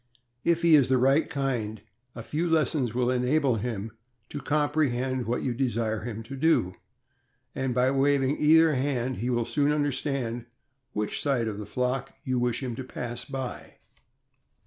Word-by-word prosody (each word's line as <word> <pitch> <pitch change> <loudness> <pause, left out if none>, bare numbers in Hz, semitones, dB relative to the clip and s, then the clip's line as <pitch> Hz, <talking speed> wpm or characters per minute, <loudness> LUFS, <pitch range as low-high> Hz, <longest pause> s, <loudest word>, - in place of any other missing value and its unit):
If 170 0 +2
he 170 -1 +5
is 140 -5 +6
the 130 - +4
"right 135 +5 +3
kind," 125 -8 -2 0.4
a 115 - -7
few 165 +7 -2
lessons 150 -7 +1
will 125 0 +2
enable 130 0 +2
him 110 -1 -4 0.4
to 145 - -6
comprehend 135 -4 0
what 120 +2 -1
you 125 - 0
desire 115 -3 -1
him 115 0 -6
to 130 +5 -8
do, 135 - +2 0.8
and 130 -2 -2
by 125 +1 +3
waving 140 0 +2
either 160 +1 +5
hand 130 -2 -1
he 120 +5 -2
will 120 -2 +1
soon 145 +4 +1
understand 135 -5 -1 0.5
which 105 0 -2
side 135 -6 +1
of 105 -1 -4
the 105 - -7
flock 125 +1 -2
you 130 -4 0
wish 125 +1 -1
him 125 -2 -3
to 130 - -4
pass 120 -1 -5
by. 135 -3 -6
130 Hz, 165 wpm, -27 LUFS, 120-145 Hz, 0.8 s, is